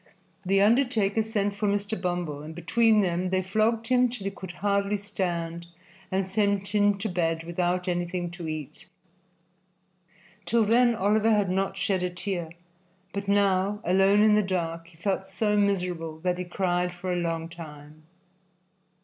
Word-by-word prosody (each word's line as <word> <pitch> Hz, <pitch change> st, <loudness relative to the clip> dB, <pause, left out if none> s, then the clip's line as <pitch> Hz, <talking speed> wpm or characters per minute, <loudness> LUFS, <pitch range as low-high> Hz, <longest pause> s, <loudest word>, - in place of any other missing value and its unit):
The 195 Hz, +1 st, +2 dB
undertaker 225 Hz, -2 st, +3 dB
sent 210 Hz, -2 st, -1 dB
for 205 Hz, +1 st, -2 dB
Mr. 205 Hz, +1 st, 0 dB
Bumble, 175 Hz, -5 st, -2 dB
and 155 Hz, +2 st, -9 dB
between 215 Hz, +6 st, +3 dB
them 180 Hz, -1 st, 0 dB
they 185 Hz, 0 st, 0 dB
flogged 220 Hz, +4 st, +1 dB
him 250 Hz, +1 st, +3 dB
till 235 Hz, -5 st, -7 dB
he 195 Hz, -, -1 dB
could 190 Hz, -2 st, -9 dB
hardly 200 Hz, +2 st, 0 dB
stand 170 Hz, -4 st, -3 dB, 0.4 s
and 190 Hz, 0 st, 0 dB
sent 200 Hz, 0 st, 0 dB
him 205 Hz, 0 st, +3 dB
to 200 Hz, -, -3 dB
bed 165 Hz, -3 st, -1 dB
without 175 Hz, +1 st, -1 dB
anything 175 Hz, 0 st, -2 dB
to 175 Hz, -2 st, -7 dB
eat. 155 Hz, -3 st, -6 dB, 1.6 s
Till 230 Hz, -1 st, +3 dB
then 235 Hz, +2 st, +4 dB
Oliver 215 Hz, +2 st, +2 dB
had 205 Hz, -4 st, +2 dB
not 195 Hz, +1 st, -1 dB
shed 195 Hz, -1 st, 0 dB
a 180 Hz, -, 0 dB
tear, 180 Hz, -2 st, -4 dB, 0.6 s
but 200 Hz, 0 st, -4 dB
now, 200 Hz, 0 st, +2 dB
alone 195 Hz, +3 st, +4 dB
in 215 Hz, -1 st, +5 dB
the 210 Hz, -, +5 dB
dark, 170 Hz, -4 st, -3 dB
he 170 Hz, -1 st, -19 dB
felt 190 Hz, +2 st, -2 dB
so 210 Hz, -2 st, 0 dB
miserable 180 Hz, -6 st, 0 dB
that 180 Hz, 0 st, -1 dB
he 180 Hz, -, -3 dB
cried 180 Hz, 0 st, -1 dB
for 180 Hz, +1 st, -4 dB
a 175 Hz, -, -1 dB
long 165 Hz, -1 st, -2 dB
time. 155 Hz, -2 st, -11 dB
190 Hz, 160 wpm, -27 LUFS, 175-205 Hz, 1.6 s, in